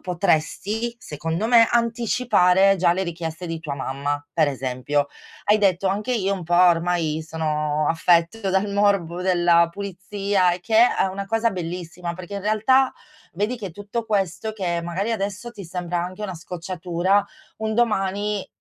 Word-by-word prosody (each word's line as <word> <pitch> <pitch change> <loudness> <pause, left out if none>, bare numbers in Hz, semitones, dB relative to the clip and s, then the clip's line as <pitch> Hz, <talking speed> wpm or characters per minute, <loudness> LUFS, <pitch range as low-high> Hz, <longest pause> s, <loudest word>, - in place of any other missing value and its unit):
potresti, 195 +6 -1
secondo 165 - -3
me, 230 -1 +6
anticipare 230 -5 +3
già 175 -1 +3
le 190 +2 -1
richieste 165 0 -5
di 165 -1 -4
tua 155 -3 -6
mamma. 140 +2 -3
Per 155 -3 +3
esempio 135 +2 -1 0.4
hai 210 - +4
detto: 195 -2 +2
"Anche 210 +6 -1
io 200 -4 0
un 185 - -6
po' 175 +2 0
ormai 170 -2 +2
sono 150 -1 -1
affetto 175 +5 +2
dal 190 +2 +1
morbo 200 -4 +1
della 175 -2 +4
pulizia:" 200 -1 -1
E 175 - -4
che, 220 +4 -4 0.2
uhm, - - +3
è - - -3
una 200 +1 -5
cosa 225 +3 +1
bellissima, 175 -1 -5
perché 185 +3 -8
in 200 - -4
realtà 235 +5 +3 0.4
vedi 210 +7 -1
che, 200 -5 -6
tutto 205 +6 -5
questo, 200 0 -1
che 175 -5 -2
magari 185 +6 -2
adesso 205 +2 -3
ti 205 -4 -9
sembra 175 0 -3
anche 185 +3 -8
una 190 -3 -4
scocciatura, 180 +3 -1 0.3
un 220 0 -2
domani, 205 -3 0
185 Hz, 160 wpm, -23 LUFS, 170-205 Hz, 0.4 s, me